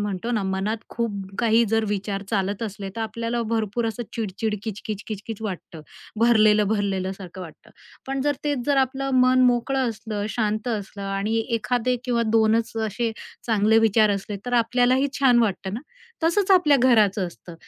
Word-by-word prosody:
म्हणतो 205 +2 -3
ना, 220 -4 0
मनात 190 +3 -1
खूप 230 -2 -2 0.3
काही 230 0 +4
जर 225 +1 +1
विचार 200 -1 -2
चालत 200 0 -1
असले, 200 -2 -5
तर - - -3
आपल्याला 230 +2 -2
भरपूर 225 0 -1
असं 225 +2 -3
चिड-चिड, 220 0 -2
किच-किच, 215 -1 -5
किच-किच 215 0 -6
वाटतं, 180 -5 -6 0.4
भरलेलं-भरलेलं 210 -4 +3
सारखं 190 -1 -10
वाटतं. 165 -4 -11 0.4
पण 270 0 -2
जर 290 +1 +1
तेच 285 -4 -1
जर 285 -1 +2
आपलं 270 +1 0
मन 255 0 +4
मोकळं 250 +1 +1
असलं, 215 -2 -4
शांत 215 +1 -1
असलं 205 -3 -4
आणि 195 +3 -1 0.2
एखादे 245 +3 0
किंवा 240 -2 +1
2 220 0 +4
च 225 - -10
असे 225 +3 -2 0.4
चांगले 220 -1 +3
विचार 215 0 +4
असले, 200 +1 -5
तर 245 - -4
आपल्यालाही 250 +4 +2
छान 250 -3 +5
वाटतं 195 -2 -2
ना. 230 - -4 0.4
तसंच 385 +4 +2
आपल्या 345 -7 +6
घराचं 215 -6 +4
असतं. 175 0 -11
220 Hz, 165 wpm, -24 LUFS, 205-240 Hz, 0.4 s, आपल्या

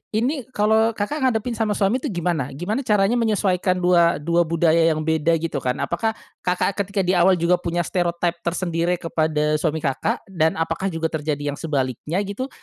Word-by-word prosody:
Ini 255 +3 -1
kalau 220 +2 +3
Kakak 215 +9 -2
ngadepin 230 -1 -1
sama 215 -2 +1
suami 200 +6 +1
tuh - - -4
gimana? 165 -7 -2
Gimana 180 - -2
caranya 210 +3 +3
menyesuaikan 195 -5 +1
dua 170 -1 +4
dua 170 +3 +1
budaya 165 0 +2 0.2
yang 155 - -3
beda 160 +1 +2
gitu 165 -3 -2
kan? 125 -1 -1
Apakah 220 +6 -1 0.2
Kakak 180 +2 0 0.2
ketika 200 -1 -1
di 180 - +1
awal 185 +1 +4
juga 175 +1 +2
punya 175 +1 -1
stereotype 170 0 -1
tersendiri 170 0 -1
kepada 155 -3 0
suami 160 -1 -1
Kakak, 135 -3 -1
dan 160 -3 +1
apakah 165 +4 -2
juga 165 -3 -2
terjadi 145 -2 -2
yang 140 - -8
sebaliknya 140 0 -2
gitu? 205 +6 -4
175 Hz, 175 wpm, -22 LUFS, 160-200 Hz, 0.2 s, dua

